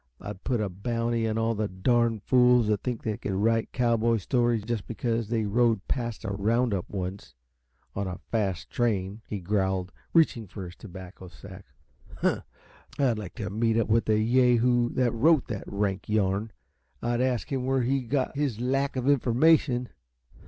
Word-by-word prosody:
I'd 95 Hz, -, -8 dB
put 120 Hz, -3 st, 0 dB
a 105 Hz, -, 0 dB
bounty 115 Hz, +4 st, -1 dB
on 110 Hz, 0 st, -1 dB
all 115 Hz, 0 st, +1 dB
the 105 Hz, -1 st, -1 dB
darn 115 Hz, +3 st, +1 dB
fools 125 Hz, 0 st, +4 dB
that 105 Hz, -2 st, +1 dB
think 125 Hz, -3 st, -3 dB
they 110 Hz, -2 st, -2 dB
can 95 Hz, -4 st, -3 dB
write 115 Hz, +1 st, +1 dB
cowboy 115 Hz, -1 st, +2 dB
stories 120 Hz, +1 st, +1 dB
just 115 Hz, -2 st, -3 dB
because 115 Hz, -1 st, -2 dB
they 110 Hz, -2 st, 0 dB
rode 115 Hz, -1 st, +1 dB
past 120 Hz, -4 st, -3 dB
a -, -, -2 dB
roundup 105 Hz, 0 st, 0 dB
once, 95 Hz, -5 st, -5 dB, 0.6 s
on 100 Hz, -1 st, -2 dB
a 90 Hz, -2 st, -5 dB
fast 100 Hz, -7 st, -1 dB
train," 105 Hz, -3 st, -1 dB
he 105 Hz, -, -4 dB
growled, 95 Hz, -1 st, -1 dB, 0.2 s
reaching 140 Hz, -10 st, +3 dB
for 95 Hz, +1 st, -7 dB
his 90 Hz, 0 st, -10 dB
tobacco 95 Hz, -2 st, -11 dB
sack. 85 Hz, -2 st, -12 dB, 0.5 s
"Huh! -, -, +1 dB, 0.6 s
I'd 125 Hz, -6 st, +2 dB
like 100 Hz, -5 st, -8 dB
to 105 Hz, -4 st, -4 dB
meet 115 Hz, +2 st, +1 dB
up 115 Hz, -2 st, +1 dB
with 115 Hz, +1 st, +3 dB
the 110 Hz, -1 st, +2 dB
yahoo 120 Hz, +1 st, +3 dB
that 125 Hz, -2 st, +2 dB
wrote 150 Hz, +5 st, +4 dB
that 105 Hz, -4 st, -4 dB
rank 100 Hz, -1 st, -2 dB
yarn! 105 Hz, +1 st, 0 dB, 0.5 s
I'd 120 Hz, +1 st, 0 dB
ask 130 Hz, -1 st, -1 dB
him 130 Hz, -2 st, -1 dB
where 135 Hz, -1 st, +2 dB
he 135 Hz, +2 st, +1 dB
got 130 Hz, +2 st, -1 dB
his 140 Hz, -6 st, -1 dB
lack 135 Hz, +3 st, 0 dB
of 130 Hz, 0 st, -2 dB
information. 130 Hz, -1 st, +3 dB
115 Hz, 175 wpm, -27 LUFS, 100-125 Hz, 0.6 s, fools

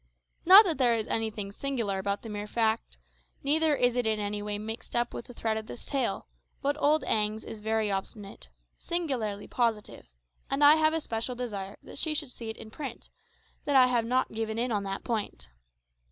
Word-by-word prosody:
Not 395 Hz, +4 st, +11 dB
that 330 Hz, -6 st, -1 dB
there 240 Hz, -3 st, +4 dB
is 220 Hz, -1 st, -1 dB
anything 215 Hz, -3 st, -2 dB
singular 230 Hz, -5 st, -2 dB
about 200 Hz, +1 st, -2 dB
the 225 Hz, -, -7 dB
mere 205 Hz, 0 st, -5 dB
fact, 225 Hz, 0 st, 0 dB, 0.5 s
neither 305 Hz, +2 st, +3 dB
is 245 Hz, -2 st, +2 dB
it 245 Hz, -2 st, +1 dB
in 215 Hz, -1 st, +1 dB
any 205 Hz, 0 st, -2 dB
way 205 Hz, 0 st, -2 dB
mixed 220 Hz, +3 st, -6 dB
up 240 Hz, 0 st, 0 dB
with -, -, -6 dB
the 245 Hz, -, -11 dB
thread 220 Hz, -1 st, -1 dB
of 220 Hz, 0 st, -6 dB
this -, -, -8 dB
tale; 275 Hz, -2 st, -1 dB, 0.3 s
but 285 Hz, 0 st, 0 dB
old 300 Hz, +2 st, +3 dB
Agnes 215 Hz, 0 st, 0 dB
is 220 Hz, -, -8 dB
very 220 Hz, -1 st, 0 dB
obstinate 195 Hz, -, -5 dB, 0.3 s
singularly 250 Hz, -12 st, -2 dB
positive 230 Hz, -4 st, -1 dB, 0.4 s
and 275 Hz, +2 st, +1 dB
I 295 Hz, +2 st, +8 dB
have 315 Hz, 0 st, +3 dB
a 325 Hz, -, 0 dB
special 230 Hz, 0 st, -3 dB
desire 205 Hz, -5 st, -5 dB
that -, -, -9 dB
she 315 Hz, -2 st, 0 dB
should 295 Hz, -4 st, -3 dB
see 230 Hz, -2 st, -7 dB
it 220 Hz, -, -6 dB
in 220 Hz, -, -10 dB
print, 265 Hz, -2 st, -7 dB, 0.6 s
that 285 Hz, -, 0 dB
I 260 Hz, -1 st, +8 dB
have 245 Hz, -2 st, +1 dB
not 255 Hz, +2 st, +1 dB
given 220 Hz, 0 st, -3 dB
in 240 Hz, +1 st, 0 dB
on 205 Hz, -2 st, +1 dB
that 195 Hz, 0 st, -4 dB
point. 200 Hz, -, -4 dB
225 Hz, 200 wpm, -29 LUFS, 210-270 Hz, 0.6 s, Not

